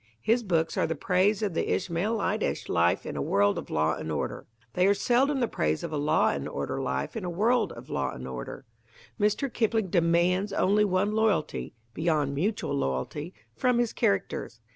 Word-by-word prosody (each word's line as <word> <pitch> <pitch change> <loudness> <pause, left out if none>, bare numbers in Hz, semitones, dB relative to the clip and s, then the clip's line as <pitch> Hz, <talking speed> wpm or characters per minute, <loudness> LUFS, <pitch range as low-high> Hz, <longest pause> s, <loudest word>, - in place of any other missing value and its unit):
His 235 +2 +3
books 165 -6 0
are - - +2
the 160 - -2
praise 195 +6 +1
of 200 -4 -1
the - - -1
Ishmaelitish 200 +4 -1
life 85 +1 +2
in - - -5
a - - -2
world 100 0 +2
of - - -9
law 80 +1 +1
and 80 0 -5
order. 75 - -3 0.3
They 180 +1 +3
are 200 - +4
seldom 260 +6 +2
the 240 - +2
praise 80 - -1
of 165 - -4
a - - 0
law 150 +2 +3
and 70 -1 -3
order - - -3
life 65 0 -2
in 220 - -4
a 180 - -3
world 225 +7 +2
of - - -11
law - - -1
and 65 +1 -7
order. 65 - -7 0.5
Mr. 210 +6 +1
Kipling 220 -4 0
demands 175 +3 +2
only 205 +2 +3
one 195 +1 +1
loyalty 205 - 0 0.2
(beyond 155 -3 0
mutual 195 +4 -1
loyalty) 140 - -3 0.2
from 250 -2 +2
his 240 -2 +1
characters. 100 -1 -1
180 Hz, 185 wpm, -28 LUFS, 140-210 Hz, 0.5 s, are